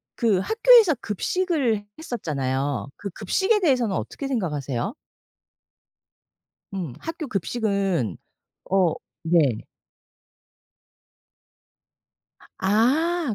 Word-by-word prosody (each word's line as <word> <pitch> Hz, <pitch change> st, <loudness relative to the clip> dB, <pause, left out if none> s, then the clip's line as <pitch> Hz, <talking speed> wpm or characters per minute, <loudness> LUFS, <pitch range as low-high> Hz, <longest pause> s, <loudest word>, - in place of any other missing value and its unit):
그 220 Hz, -6 st, +2 dB
학교에서 445 Hz, -, +5 dB
급식을 245 Hz, -, 0 dB
했었잖아요. 140 Hz, -, -2 dB
그 200 Hz, -, -6 dB
급식에 380 Hz, -, +1 dB
대해서는 250 Hz, -, +2 dB
어떻게 275 Hz, -, -4 dB
생각하세요? 150 Hz, -, -2 dB, 1.8 s
음. 175 Hz, -10 st, -4 dB
학교 325 Hz, -1 st, -5 dB
급식은 195 Hz, -, -1 dB, 0.6 s
어. 185 Hz, -4 st, +3 dB, 0.3 s
네. 160 Hz, -9 st, +2 dB, 2.9 s
아. 265 Hz, -, +2 dB
210 Hz, 170 characters per minute, -24 LUFS, -, 2.9 s, 학교에서